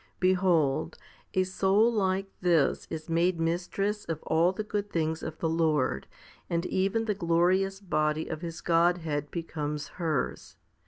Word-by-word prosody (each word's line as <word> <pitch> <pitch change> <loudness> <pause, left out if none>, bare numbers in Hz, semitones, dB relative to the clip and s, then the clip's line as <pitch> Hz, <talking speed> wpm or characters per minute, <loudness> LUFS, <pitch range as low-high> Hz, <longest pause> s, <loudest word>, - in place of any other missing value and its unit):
Behold, 170 -5 +2 0.4
a 185 - +4
soul 195 +5 +2
like 195 -2 +1 0.2
this 170 -6 +2
is 160 -1 -6
made 170 +1 +1
mistress 185 +5 -1
of 160 -2 -4
all 165 +3 +3
the 205 +3 -4
good 205 -1 -3
things 160 -2 -1
of 160 0 -6
the 165 - -1
Lord, 155 - +1 0.4
and 170 +1 0
even 195 +5 0
the 215 - +1
glorious 185 +2 +2
body 155 -4 0
of 155 -1 -5
His 165 -2 -6
Godhead 165 -4 +1
becomes 150 -3 -4
hers. 155 -6 -2
170 Hz, 145 wpm, -28 LUFS, 160-190 Hz, 0.4 s, a